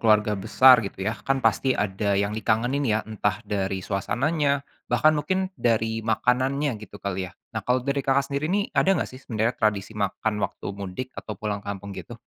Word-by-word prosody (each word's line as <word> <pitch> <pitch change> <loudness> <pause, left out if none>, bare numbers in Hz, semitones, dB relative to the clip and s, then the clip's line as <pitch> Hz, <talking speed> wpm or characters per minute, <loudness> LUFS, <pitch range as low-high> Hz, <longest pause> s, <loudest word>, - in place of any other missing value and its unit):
keluarga 105 -1 +4
besar 115 +5 +6
gitu 100 -2 -5
ya 110 - +1 0.2
kan 135 - +3
pasti 130 +3 +3
ada 100 0 0
yang 100 +1 +1
dikangenin 115 +5 0
ya 110 0 +3
entah 105 0 -2
dari 95 -2 -2
suasananya, 140 +7 0 0.2
bahkan 155 - +4
mungkin 185 +5 -1
dari 115 -1 +1
makanannya 130 +6 +1
gitu 105 -1 -10
kali 95 -2 -3
ya, - - -17 0.2
nah 110 - -2
kalau 125 +4 0
dari 140 0 0
Kakak 135 +1 +1
sendiri 140 +2 -1
nih 200 +3 +1
ada 195 0 +3
nggak 145 - -1
sih 130 - -10
sebenarnya 115 +1 0
tradisi 105 -1 +1
makan 105 +1 -1
waktu 100 0 -3
mudik 100 +5 -5
atau 105 - -6
pulang 105 0 -3
kampung 100 0 -6
gitu? 95 +5 -8
110 Hz, 185 wpm, -25 LUFS, 100-135 Hz, 0.2 s, besar